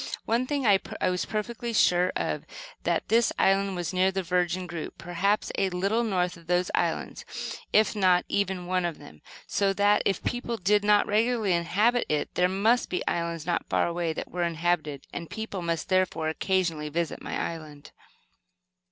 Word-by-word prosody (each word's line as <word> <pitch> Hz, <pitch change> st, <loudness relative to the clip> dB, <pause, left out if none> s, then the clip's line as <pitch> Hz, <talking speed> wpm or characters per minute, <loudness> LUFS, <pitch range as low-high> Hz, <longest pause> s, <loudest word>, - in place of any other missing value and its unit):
One 235 Hz, +3 st, +1 dB
thing 285 Hz, -2 st, -1 dB
I 200 Hz, -3 st, +5 dB, 0.2 s
was 180 Hz, -1 st, 0 dB
perfectly 235 Hz, +2 st, -3 dB
sure 180 Hz, -4 st, +4 dB
of, -, -, -2 dB, 0.4 s
that -, -, 0 dB
this 230 Hz, 0 st, +4 dB
island 195 Hz, 0 st, +2 dB
was 175 Hz, 0 st, -3 dB
near 185 Hz, +1 st, +3 dB
the 190 Hz, 0 st, -2 dB
Virgin 180 Hz, +1 st, 0 dB
group, 170 Hz, -3 st, -6 dB
perhaps 190 Hz, +4 st, 0 dB
a 195 Hz, -, +2 dB
little 195 Hz, +6 st, 0 dB
north 180 Hz, -5 st, 0 dB
of 170 Hz, -1 st, -18 dB
those 180 Hz, +1 st, +1 dB
islands, -, -, -1 dB, 0.5 s
if 215 Hz, +1 st, +3 dB
not 185 Hz, -3 st, +3 dB
even 190 Hz, -3 st, -1 dB
one 185 Hz, 0 st, 0 dB
of 170 Hz, -3 st, -2 dB
them; 75 Hz, 0 st, -14 dB, 0.2 s
so 200 Hz, -1 st, +1 dB
that, 205 Hz, +1 st, +3 dB
if 195 Hz, -, 0 dB
people 240 Hz, -1 st, -2 dB
did 205 Hz, +1 st, +2 dB
not 205 Hz, 0 st, +4 dB
regularly 220 Hz, -2 st, +1 dB
inhabit 205 Hz, +8 st, +2 dB
it, 150 Hz, -1 st, -1 dB
there 180 Hz, 0 st, +2 dB
must 220 Hz, +6 st, +2 dB
be 180 Hz, -, -2 dB
islands 170 Hz, -2 st, -2 dB
not 175 Hz, 0 st, -1 dB
far -, -, +2 dB
away 170 Hz, -1 st, -1 dB
that -, -, -6 dB
were 180 Hz, -, -3 dB
inhabited, 165 Hz, -4 st, -1 dB
and 170 Hz, -1 st, -6 dB
people 220 Hz, -4 st, -5 dB
must, 170 Hz, -2 st, -2 dB
therefore, 185 Hz, -4 st, +1 dB
occasionally 165 Hz, -3 st, 0 dB
visit 165 Hz, 0 st, -2 dB
my -, -, -4 dB
island. 155 Hz, -3 st, -6 dB
185 Hz, 175 wpm, -27 LUFS, 170-205 Hz, 0.5 s, I